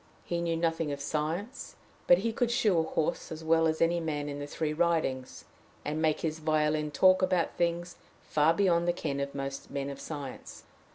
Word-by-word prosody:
He 170 -1 -2
knew 165 -1 0
nothing 165 -2 0
of 140 - -4
science; 160 - -3 0.3
but 175 - +8
he 225 +4 -1
could 240 +1 +1
shoe 220 -8 +3
a - - +4
horse 160 -1 -2
as 160 0 -6
well 160 0 +4
as 160 0 0
any 170 +1 +2
man 150 -3 -2
in 145 0 -5
the 145 - -5
three 155 +1 -2
Ridings, 155 -6 -1 0.4
and 155 +1 -2
make 155 -1 +1
his 160 -1 -2
violin 155 -1 +1
talk 185 +5 +5
about 185 -2 +1
things 175 0 -1 0.3
far 150 +1 +3
beyond 170 -2 +2
the 175 - +3
ken 145 -5 -3
of 140 0 -3
most 135 0 -5
men 140 0 -3
of 140 - -9
science. 145 -4 -7
160 Hz, 195 wpm, -30 LUFS, 150-170 Hz, 0.4 s, but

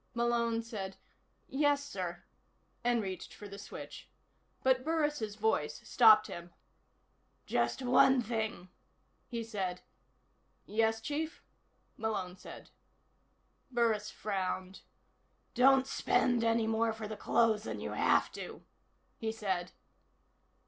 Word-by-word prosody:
Malone 235 -1 +1
said: 195 -4 -6 0.5
"Yes, 285 0 +2
sir," 180 -10 -5 0.6
and 240 -2 +2
reached 190 -1 -6
for 205 - -9
the 200 0 -9
switch. 200 - -9 0.5
But 260 -1 +3
Burris' 295 -9 0
voice 180 -9 0
stopped 215 -3 +7
him. 170 0 -8 0.9
"Just 120 - 0
one 255 +1 +5
thing," 220 -5 -3 0.6
he 235 -2 -3
said. 190 -5 -3 0.8
"Yes, 225 +1 +1
Chief?" 310 +6 -3 0.5
Malone 195 -5 -2
said. - - -11 1.0
Burris 230 -4 +1
frowned. 190 -2 -3 0.7
"Don't 265 +1 +5
spend 245 -2 +2
any 230 0 +2
more 225 0 +1
for 220 -1 -6
the 215 - -5
clothes 220 0 +2
than - - -4
you - - -4
have - - +3
to," - - -8 0.6
he 220 -1 -1
said. 190 -5 -2
225 Hz, 110 wpm, -33 LUFS, 195-240 Hz, 1.0 s, stopped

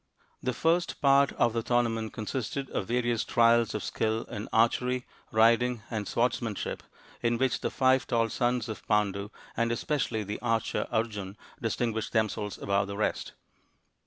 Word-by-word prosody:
The 130 - 0
first 170 +6 +1
part 140 0 +5
of 120 -1 +2
the 115 - 0
tournament 115 -2 0
consisted 130 +4 -4
of 95 - -2
various 120 -1 +1
trials 115 -1 +3
of 105 - -2
skill 110 +1 -1
in 105 +1 -7
archery, 125 +2 +2 0.3
riding, 115 +1 +3
and 105 -3 -2
swords 120 +1 +1
manship, 110 -4 -4 0.4
in 120 0 +1
which 130 -2 +1
the - - 0
five 130 0 +2
taU 115 -2 +2
sons 120 0 0
of 110 - -6
Pandu, 105 -1 +1 0.3
and 115 0 +1
especially 120 -3 -1
the 105 +1 -5
archer 115 -2 0
Arjun, 105 -3 -2 0.2
distinguished 115 -1 -1
themselves 105 -2 0
above 100 0 0
the 100 0 -5
rest. 105 - -1
115 Hz, 155 wpm, -29 LUFS, 110-125 Hz, 0.4 s, part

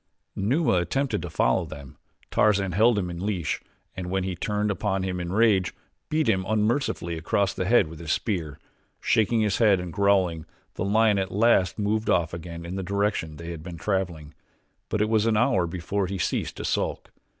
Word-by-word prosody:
Numa 125 - +2
attempted 110 +6 -1
to 90 - -5
follow 80 +1 +2
them; 70 -4 -10 0.4
Tarzan 100 -3 +3
held 110 +5 +4
him 90 -3 -1
in 85 +1 -6
leash 90 -8 -2 0.3
and 90 -1 -5
when 95 0 0
he 95 -1 -3
turned 105 +4 -1
upon 95 -1 -1
him 90 -1 -2
in 90 0 -4
rage, 100 -3 +3 0.3
beat 155 0 +1
him 95 -4 +2
unmercifully 105 - 0
across 100 +4 0
the 95 - -2
head 105 -3 +4
with 80 0 -10
his 80 -2 -4
spear. 80 -9 -2 0.4
Shaking 110 +1 +2
his 105 -2 +1
head 105 -5 +5
and 90 -2 -6
growling, 95 -5 +2 0.3
the - - -3
lion 105 0 +3
at 95 0 -2
last 105 -3 +3
moved 110 +1 0
off 85 -1 +2
again 85 0 -7
in 90 +3 -5
the - - -2
direction 100 -4 -1
they 85 0 -7
had 80 -2 -7
been 85 0 -8
traveling; 85 -4 -2 0.6
but 105 - +1
it - - 0
was 110 0 +2
an 110 -2 +2
hour 105 -7 +2
before 90 +3 -2
he 95 +1 -3
ceased 85 - -2
to - - -5
sulk. - - -2
95 Hz, 195 wpm, -26 LUFS, 85-105 Hz, 0.6 s, head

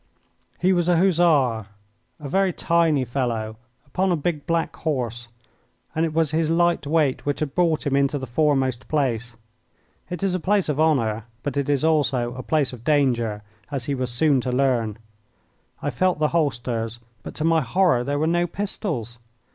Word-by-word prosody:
He 185 +2 +2
was 175 -2 +1
a 175 - +4
Hussar, 155 - +3 0.5
a 150 - -7
very 190 +5 +2
tiny 165 -5 +2
fellow, 115 -3 -2 0.3
upon 185 +7 0
a - - +3
big 155 -1 -3
black 165 -1 0
horse, 120 -6 -3 0.7
and 160 - 0
it 165 - 0
was 160 -2 +1
his 160 0 +1
light 170 -2 +2
weight 150 -3 +1
which 145 -1 -2
had 150 -3 -3
brought 165 -2 +1
him 140 -1 +1
into 140 +1 +2
the 130 - -5
foremost 130 -1 0
place. 125 -5 -1 0.7
It 180 +2 -5
is 195 -2 +1
a 185 - 0
place 195 0 +1
of 150 0 -1
honour; 115 -9 +1 0.2
but 145 - -3
it 140 0 -1
is 140 -1 +1
also 135 -6 +1
a 130 - -6
place 145 -2 0
of 120 -2 -10
danger, 120 -8 +1 0.3
as 135 -4 -3
he 140 - -1
was 130 -2 -2
soon 135 +2 +2
to 125 - -2
learn. 125 -5 +1 0.9
I 145 - -1
felt 185 +9 +1
the 150 0 +1
holsters, 120 -7 -1 0.2
but, - - -9
to 155 - -2
my 165 0 +3
horror, 150 -1 +2
there 140 +3 -1
were 155 - +1
no 175 +2 +1
pistols. 160 - -4
145 Hz, 180 wpm, -23 LUFS, 125-165 Hz, 0.9 s, a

